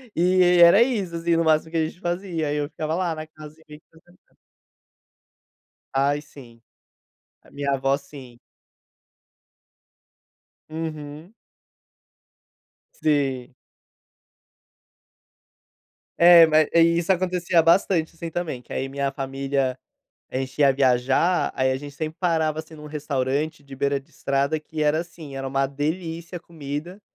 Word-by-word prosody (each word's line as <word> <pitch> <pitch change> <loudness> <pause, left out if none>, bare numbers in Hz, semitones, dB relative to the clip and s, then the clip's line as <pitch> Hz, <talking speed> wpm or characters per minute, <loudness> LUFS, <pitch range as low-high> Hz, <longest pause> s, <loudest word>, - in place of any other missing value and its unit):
E 180 +2 +2
e, 180 -1 +5
era 170 +6 +8
isso 200 -9 -2
assim, 165 0 0
no 165 - +2
máximo 160 0 +2
que 165 - -2
a 160 - +2
gente 175 - -12
fazia. 175 -3 -3
Aí 145 +1 -1
eu 145 0 -2
ficava 155 0 -3
lá 175 -3 -1
na 155 0 -7
casa 155 -1 -12
sem 150 0 -13
fazer 165 +1 -21 0.2
nada. - - -34 1.6
Ai, 140 +2 +1
sim. 120 -6 -15 0.8
A - - -21
minha 140 0 -2
avó 135 0 +1
sim. 135 -4 -13 2.3
Uhum. 155 +2 -7 1.6
Sim. 135 -5 -1 2.7
É, 170 -1 +9
ma 155 -1 +2
é, 170 - +5
isso 170 +2 +3
acontecia 180 -2 +2
bastante 165 0 +2
assim 165 0 -6
também, 160 -7 -4
que - - -19
aí 135 - -2
minha 140 0 -2
família, 135 -1 -2 0.5
a - - -4
gente 135 +2 -6
ia 140 -1 +6
viajar, 135 +6 +2
aí 130 0 +1
a 130 - 0
gente 145 0 -9
sempre 155 +1 -5
parava 160 -3 0
assim 160 0 -8
num 150 0 -11
restaurante 145 0 -2
de 135 -1 -12
beira 140 +1 0
de 135 - -27
estrada. 140 +3 -1
Que 155 0 -5
era 150 +1 +2
assim, 165 -5 -10
era 135 0 -4
uma 135 0 0
delícia 165 +4 -4
a 170 - -7
comida. 160 +3 -7
155 Hz, 140 wpm, -23 LUFS, 140-170 Hz, 2.7 s, É